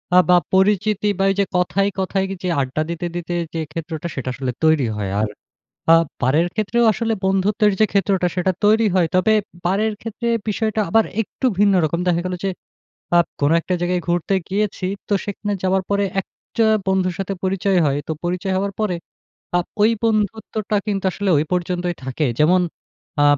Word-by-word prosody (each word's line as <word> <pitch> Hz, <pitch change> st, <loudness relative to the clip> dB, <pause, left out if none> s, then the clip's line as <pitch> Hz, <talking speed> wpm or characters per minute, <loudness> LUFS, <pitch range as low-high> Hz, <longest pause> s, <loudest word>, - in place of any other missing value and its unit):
আ -, -, +7 dB
বা 180 Hz, -, +7 dB, 0.2 s
পরিচিতি 205 Hz, +2 st, +2 dB
বা -, -, +3 dB
এই -, -, -2 dB
যে 200 Hz, -, +3 dB
কথায়, 195 Hz, +2 st, +1 dB
কথায় 190 Hz, 0 st, 0 dB
কি 195 Hz, -, -4 dB
যে 180 Hz, -, 0 dB
আড্ডা 130 Hz, +3 st, -2 dB
দিতে, 170 Hz, +1 st, -3 dB
দিতে 175 Hz, 0 st, -4 dB, 0.2 s
যে 165 Hz, -, -2 dB
ক্ষেত্রটা 165 Hz, 0 st, -5 dB
সেটা 130 Hz, -1 st, -3 dB
আসলে 130 Hz, 0 st, -3 dB
তৈরি 155 Hz, -5 st, +4 dB
হয়। 100 Hz, -2 st, -2 dB
আর 110 Hz, -, +1 dB, 0.6 s
আ -, -, +9 dB, 0.3 s
বারের 150 Hz, +7 st, +3 dB
ক্ষেত্রেও 230 Hz, +2 st, +1 dB
আসলে 225 Hz, +1 st, -1 dB
বন্ধুত্বের 205 Hz, +3 st, +2 dB
যে 215 Hz, -, +6 dB
ক্ষেত্রটা 195 Hz, -2 st, +2 dB
সেটা 185 Hz, +1 st, +1 dB
তৈরি 220 Hz, +2 st, +4 dB
হয়। 180 Hz, -3 st, +3 dB
তবে 200 Hz, +4 st, +4 dB, 0.3 s
বারের 210 Hz, +4 st, +1 dB
ক্ষেত্রে 230 Hz, +2 st, -5 dB, 0.2 s
বিষয়টা 215 Hz, +1 st, 0 dB
আবার 225 Hz, +5 st, +4 dB, 0.2 s
একটু 225 Hz, -, -5 dB
ভিন্ন 205 Hz, -1 st, +5 dB
রকম। 155 Hz, +2 st, 0 dB
দেখা 175 Hz, -1 st, +2 dB
গেলো 180 Hz, 0 st, -2 dB, 0.8 s
আপ 170 Hz, -, +4 dB
কোন 145 Hz, 0 st, +3 dB
একটা 180 Hz, -, -2 dB
জায়গায় 175 Hz, 0 st, 0 dB
ঘুরতে 175 Hz, +3 st, +1 dB
গিয়েছি, 200 Hz, -1 st, -1 dB, 0.2 s
তো 205 Hz, -, +2 dB
সেখানে 205 Hz, 0 st, -3 dB
যাওয়ার 190 Hz, 0 st, +2 dB
পরে 200 Hz, 0 st, +2 dB, 0.2 s
একটা 225 Hz, +4 st, -3 dB, 0.2 s
বন্ধুর 190 Hz, -2 st, +1 dB
সাথে 195 Hz, 0 st, -2 dB
পরিচয় 190 Hz, 0 st, +1 dB
হয়। 140 Hz, 0 st, +1 dB
তো -, -, 0 dB
পরিচয় 180 Hz, +2 st, -1 dB
হওয়ার 200 Hz, +1 st, -1 dB
পরে 205 Hz, -5 st, 0 dB, 0.6 s
আ -, -, +3 dB, 0.2 s
ওই 215 Hz, +2 st, +5 dB
বন্ধুত্বটা 215 Hz, -1 st, -1 dB
কিন্তু 195 Hz, -2 st, -1 dB
আসলে 200 Hz, +2 st, -2 dB
ওই 150 Hz, -, +1 dB
পর্যন্তই 180 Hz, 0 st, -1 dB
থাকে। 130 Hz, +4 st, -1 dB
যেমন 180 Hz, +5 st, +5 dB, 0.6 s
আ -, -, +5 dB
190 Hz, 175 wpm, -20 LUFS, 175-205 Hz, 0.8 s, আ